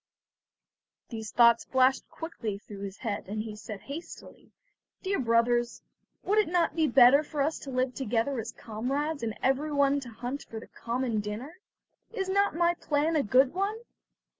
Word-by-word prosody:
These 220 -2 -6
thoughts 235 -1 +5
flashed 260 0 +2
quickly 230 -11 -5
through 200 -1 -11
his 200 0 -6
head, 210 -5 -4
and 215 +2 -3
he 215 -1 -7
said 210 -1 -8
hastily: 300 +5 -10 0.5
"Dear 390 +1 0
brothers, 240 0 +1 0.4
would 415 +2 +2
it 425 - +3
not 340 -2 +1
be 320 -2 +2
better 260 +2 +7
for 300 -1 -7
us 310 +3 -1
to 275 - -9
live 255 0 0
together 245 +1 -1
as 220 - -5
comrades, 275 +8 -3
and 225 -2 -3
everyone 280 +1 +2
to 260 -3 -9
hunt 245 +5 -5
for 225 - -6
the - - -11
common 235 -1 -2
dinner? 225 - -6 0.5
Is 390 -5 -3
not 400 -2 +2
my 345 +1 +3
plan 315 -1 0
a 300 - +4
good 255 +3 +3
one?" 395 +4 -1
260 Hz, 165 wpm, -29 LUFS, 230-310 Hz, 0.5 s, better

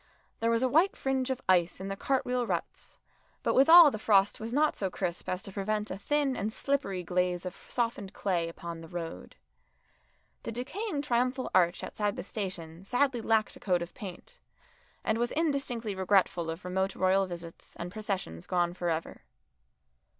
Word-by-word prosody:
There 230 - +1
was 230 +2 +2
a - - +4
white 325 +9 +3
fringe 265 -1 0
of 260 0 -2
ice 175 -2 +3
in 190 - -5
the 195 - -3
cart 265 +6 0
wheel 250 -1 0
ruts, - - -4 0.5
but - - +2
withal 320 +3 +9
the 215 - -5
frost 200 -2 +3
was 225 +1 -5
not 300 +4 +2
so 195 - -1
crisp 175 -1 -4
as 185 +1 -2
to 195 - -8
prevent 210 +2 -2
a 185 - -4
thin 285 +3 +1
and 215 0 -2
slippery 220 -8 -1
glaze 180 0 0
of 180 +1 -5
softened 230 -5 -1
clay 175 -4 -1
upon 165 0 -7
the 165 - -10
road. 165 -1 -6 1.1
The - - -5
decaying 290 - -3
triumphal 255 0 0
arch 175 0 +3
outside 205 -1 -2
the - - -5
station 185 -4 -6
sadly 245 +3 +1
lacked 220 -1 +1
a - - -12
coat 180 -3 +1
of 170 - -10
paint, 185 -4 -9 0.6
and 220 +1 0
was 240 0 0
indistinctly 275 -9 -1
regretful 190 -3 +2
of 165 +3 -6
remote 190 +1 -1
royal 190 +1 +3
visits 170 -2 -9
and 175 +1 -6
processions 195 - -4
gone 175 -1 +1
for 175 -1 -2
ever. 165 0 -3
200 Hz, 180 wpm, -30 LUFS, 180-250 Hz, 1.1 s, withal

